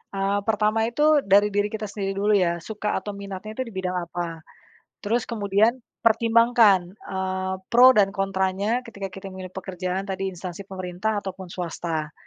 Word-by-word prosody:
Eee, 195 Hz, +1 st, +1 dB
pertama 220 Hz, +1 st, +2 dB
itu 295 Hz, +5 st, +3 dB
dari 200 Hz, +2 st, +5 dB
diri 205 Hz, 0 st, +1 dB
kita 215 Hz, 0 st, -3 dB
sendiri 195 Hz, -1 st, -3 dB
dulu 210 Hz, +1 st, +3 dB
ya, 170 Hz, -2 st, +1 dB
suka 210 Hz, +2 st, -3 dB
atau 205 Hz, -, -5 dB
minatnya 200 Hz, +1 st, -7 dB
itu 260 Hz, -, -1 dB
di 230 Hz, -, -10 dB
bidang 185 Hz, -1 st, -2 dB
apa, 170 Hz, -1 st, -5 dB, 0.6 s
terus 230 Hz, +3 st, 0 dB
kemudian 210 Hz, 0 st, +2 dB, 0.3 s
pertimbangkan, 230 Hz, -5 st, +4 dB
eee, 190 Hz, -2 st, -3 dB, 0.2 s
pro 250 Hz, +2 st, +9 dB
dan 195 Hz, -1 st, +4 dB
kontranya 195 Hz, +5 st, 0 dB
ketika 200 Hz, -3 st, -6 dB
kita 195 Hz, +1 st, -9 dB
memilih 185 Hz, 0 st, -7 dB
pekerjaan 185 Hz, 0 st, -4 dB
tadi 195 Hz, 0 st, -2 dB
instansi 180 Hz, +1 st, -7 dB
pemerintah 185 Hz, +3 st, -3 dB
ataupun 190 Hz, -1 st, -6 dB
swasta, 165 Hz, -3 st, -4 dB
195 Hz, 155 wpm, -24 LUFS, 185-215 Hz, 0.6 s, pro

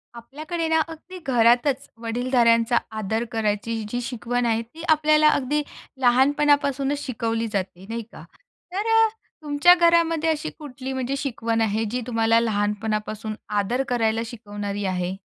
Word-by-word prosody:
आपल्याकडे 310 Hz, +8 st, -5 dB
ना, 320 Hz, 0 st, +3 dB
अगदी 330 Hz, +3 st, -10 dB
घरातचं 245 Hz, +3 st, +3 dB
वडीलधाऱ्यांचा 235 Hz, 0 st, +2 dB, 0.2 s
आदर 220 Hz, +2 st, -1 dB
करायची 220 Hz, 0 st, -1 dB
जी 245 Hz, +2 st, -2 dB
शिकवण 245 Hz, 0 st, -2 dB
आहे. 225 Hz, -1 st, +1 dB
ती 280 Hz, +9 st, -12 dB
आपल्याला 305 Hz, 0 st, +4 dB
अगदी 290 Hz, +1 st, +1 dB, 0.4 s
लहानपणापासूनचं 280 Hz, +2 st, +2 dB
शिकवली 230 Hz, -2 st, -2 dB
जाते 190 Hz, -1 st, -3 dB
,नाही 230 Hz, +1 st, -3 dB
का? -, -, -12 dB, 0.5 s
तर 405 Hz, +4 st, -2 dB
अ, 450 Hz, 0 st, +6 dB, 0.4 s
तुमच्या 295 Hz, +4 st, +5 dB
घरामध्ये 335 Hz, -2 st, +3 dB
अशी 315 Hz, 0 st, -1 dB
कुठली 270 Hz, -3 st, -7 dB
म्हणजे 260 Hz, +1 st, -2 dB
शिकवण 230 Hz, -5 st, -2 dB
आहे? 220 Hz, 0 st, +1 dB
जी 250 Hz, +1 st, -2 dB
तुम्हाला 225 Hz, -1 st, +3 dB
लहानपणापासून 215 Hz, 0 st, -2 dB, 0.2 s
आदर 240 Hz, +7 st, 0 dB
करायला 225 Hz, -2 st, +1 dB
शिकवणारी 205 Hz, -3 st, -5 dB
आहे. 185 Hz, 0 st, -2 dB
245 Hz, 135 wpm, -23 LUFS, 225-290 Hz, 0.5 s, अ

